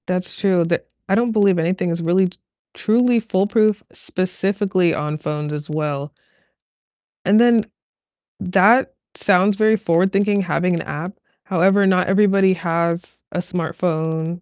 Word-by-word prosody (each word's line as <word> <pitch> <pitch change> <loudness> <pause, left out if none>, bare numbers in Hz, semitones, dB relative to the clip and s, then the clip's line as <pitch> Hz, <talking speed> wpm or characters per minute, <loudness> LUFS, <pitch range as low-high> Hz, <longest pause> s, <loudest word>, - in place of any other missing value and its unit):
That's 180 0 -2
true, 185 -4 +1
they're 170 +1 -1 0.3
I 195 - +3
don't 230 +1 +1
believe 200 -5 +3
anything 175 +2 -1
is 170 0 -3
really 180 +3 +2
t 180 - -20 0.4
truly 240 +2 +2
foolproof, 215 0 +1
specifically 185 -1 -1
on 150 +1 -3
phones 150 -1 -4
as 150 0 -7
well. 150 -2 -3 1.1
And 205 +4 +4
then, 235 -2 +4 0.8
that 210 +9 +3 0.2
sounds 200 +1 +2
very 215 +1 +3
forward-thinking, 195 +3 +1
having 180 0 0
an 170 - -1
app, 170 +6 -6 0.3
however, 195 +2 +2
not 185 -1 +2
everybody 195 -1 +3
has 170 0 -3
a - - -5
smartphone 165 -1 -3
185 Hz, 135 wpm, -20 LUFS, 170-205 Hz, 1.1 s, And